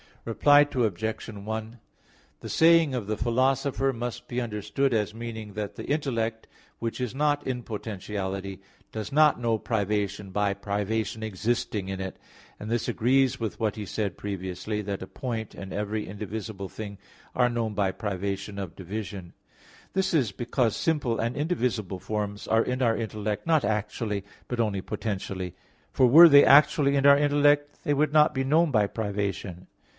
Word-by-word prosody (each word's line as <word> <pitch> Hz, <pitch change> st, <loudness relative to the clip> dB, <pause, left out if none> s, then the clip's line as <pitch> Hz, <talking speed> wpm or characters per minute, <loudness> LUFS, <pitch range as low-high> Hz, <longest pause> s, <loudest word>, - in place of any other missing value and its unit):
Reply 145 Hz, +5 st, +5 dB
Obj. 110 Hz, -3 st, -1 dB
1: 110 Hz, +2 st, -6 dB, 0.6 s
The -, -, -7 dB
saying 165 Hz, -3 st, +5 dB
of 120 Hz, -5 st, -2 dB
the 110 Hz, 0 st, -2 dB
Philosopher 135 Hz, +3 st, +1 dB
must 120 Hz, 0 st, -5 dB
be 125 Hz, 0 st, -2 dB
understood 120 Hz, +4 st, -1 dB
as 105 Hz, 0 st, -1 dB
meaning 110 Hz, -3 st, -6 dB
that 105 Hz, -1 st, -4 dB
the -, -, -7 dB
intellect 115 Hz, -7 st, -1 dB, 0.3 s
which 115 Hz, +1 st, -4 dB
is 125 Hz, 0 st, -3 dB
not 145 Hz, 0 st, +1 dB
in 125 Hz, -2 st, -2 dB
potentiality, 100 Hz, -3 st, -5 dB, 0.3 s
does 110 Hz, +4 st, -5 dB
not 150 Hz, -1 st, +4 dB
know 115 Hz, -2 st, +1 dB
privation 105 Hz, -2 st, -2 dB
by 100 Hz, +1 st, +1 dB
privation 105 Hz, +2 st, -2 dB
existing 110 Hz, -1 st, -2 dB
in 95 Hz, 0 st, -4 dB
it; 95 Hz, 0 st, -5 dB, 0.4 s
and 105 Hz, -, -6 dB
this 120 Hz, 0 st, -1 dB
agrees 130 Hz, +2 st, +2 dB
with 110 Hz, -3 st, -4 dB
what 110 Hz, -3 st, 0 dB
he 105 Hz, -2 st, -5 dB
said 100 Hz, -1 st, -3 dB
previously, 100 Hz, +1 st, -4 dB
that 100 Hz, -1 st, -4 dB
a -, -, -8 dB
point 115 Hz, -4 st, -5 dB
and 95 Hz, -1 st, -8 dB
every 105 Hz, +1 st, -3 dB
indivisible 105 Hz, -1 st, -6 dB
thing 100 Hz, -1 st, -8 dB, 0.4 s
are 125 Hz, -1 st, +3 dB
known 115 Hz, -3 st, -2 dB
by 100 Hz, -1 st, +1 dB
privation 100 Hz, 0 st, -4 dB
of 95 Hz, -4 st, -6 dB
division. 95 Hz, -1 st, -6 dB, 0.6 s
This 190 Hz, -1 st, 0 dB
is 130 Hz, -10 st, +2 dB
because 120 Hz, +1 st, 0 dB
simple 145 Hz, -8 st, 0 dB
and 115 Hz, +2 st, -1 dB
indivisible 125 Hz, -, -1 dB
forms 105 Hz, 0 st, -4 dB
are 115 Hz, +1 st, +3 dB
in 125 Hz, +1 st, -2 dB
our 115 Hz, -2 st, +2 dB
intellect 110 Hz, +2 st, -3 dB
not 160 Hz, -3 st, +3 dB
actually, 105 Hz, -1 st, -2 dB, 0.2 s
but 125 Hz, -, -4 dB
only 105 Hz, -4 st, 0 dB
potentially; 95 Hz, -3 st, -4 dB, 0.4 s
for 130 Hz, -, +4 dB
were 165 Hz, +7 st, +10 dB
they 145 Hz, -1 st, +8 dB
actually 140 Hz, 0 st, +5 dB
in 140 Hz, 0 st, +4 dB
our 140 Hz, 0 st, +8 dB
intellect, 145 Hz, 0 st, +3 dB
they 145 Hz, -, +1 dB
would 150 Hz, +1 st, +1 dB
not 150 Hz, -1 st, +5 dB
be 135 Hz, -, +1 dB
known 155 Hz, +5 st, +3 dB
by 105 Hz, -5 st, +3 dB
privation. 100 Hz, -4 st, -4 dB
110 Hz, 160 wpm, -27 LUFS, 100-130 Hz, 0.6 s, were